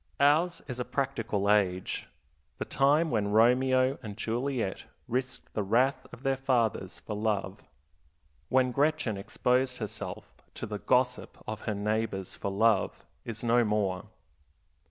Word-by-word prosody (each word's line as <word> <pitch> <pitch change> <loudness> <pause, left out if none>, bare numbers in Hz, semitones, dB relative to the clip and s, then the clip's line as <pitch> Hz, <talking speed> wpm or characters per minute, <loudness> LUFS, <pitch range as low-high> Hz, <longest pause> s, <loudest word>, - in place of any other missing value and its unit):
Ours 160 +5 +3
is 125 -3 -5
a - - 0
practical 120 -7 -1
age. 95 -3 +1 0.5
The - - -3
time 145 +4 +3
when 105 -3 +1
Romeo 130 +5 +4
and 105 -4 -7
Juliet 115 -2 -2 0.2
risked 125 +1 -3
the 105 - 0
wrath 120 +7 +2
of 125 +1 -12
their 135 0 +2
fathers 120 -8 0
for 105 - -5
love, 105 -2 -2 0.8
when 130 -1 +3
Gretchen 145 -5 +1
exposed 125 +5 0
herself 105 -4 -6 0.2
to - - -5
the 105 -1 -5
gossip 125 +4 +1
of 110 0 -5
her 105 - 0
neighbors 105 -2 -2
for - - -3
love, 105 +1 +2 0.2
is 115 -1 -6
no 120 +1 +4
more. 105 -4 0
115 Hz, 135 wpm, -29 LUFS, 105-130 Hz, 0.8 s, Romeo